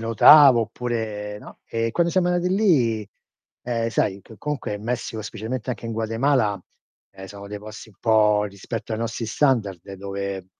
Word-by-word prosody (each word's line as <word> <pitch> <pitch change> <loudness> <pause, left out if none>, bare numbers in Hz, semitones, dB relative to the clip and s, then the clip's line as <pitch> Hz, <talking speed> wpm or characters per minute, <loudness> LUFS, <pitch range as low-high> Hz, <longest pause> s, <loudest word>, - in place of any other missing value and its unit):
notavo, 120 +3 +7
oppure 110 -3 -4
no; - - -14
e 115 0 -2
quando 170 +3 +1
siamo 180 0 +2
andati 180 +1 +1
lì, 125 - +2 0.5
ehm, 115 -1 -1
sai, 100 -3 -1
che 110 - -15
comunque 150 -4 -3
in 105 - -8
Messico 115 -1 -3
specialmente 110 +4 -5
anche 120 - -5
in 115 - -4
Guatemala, 115 -1 0 0.5
ehm, 95 - -11
sono 100 +1 -10
dei 105 0 -6
posti 110 +2 -10
un 100 - -25
po' 105 -2 +3
rispetto 105 +3 -6
ai 110 - -2
nostri 115 0 -3
standard, 110 - +1
dove 100 -1 -5
115 Hz, 165 wpm, -23 LUFS, 105-125 Hz, 0.5 s, notavo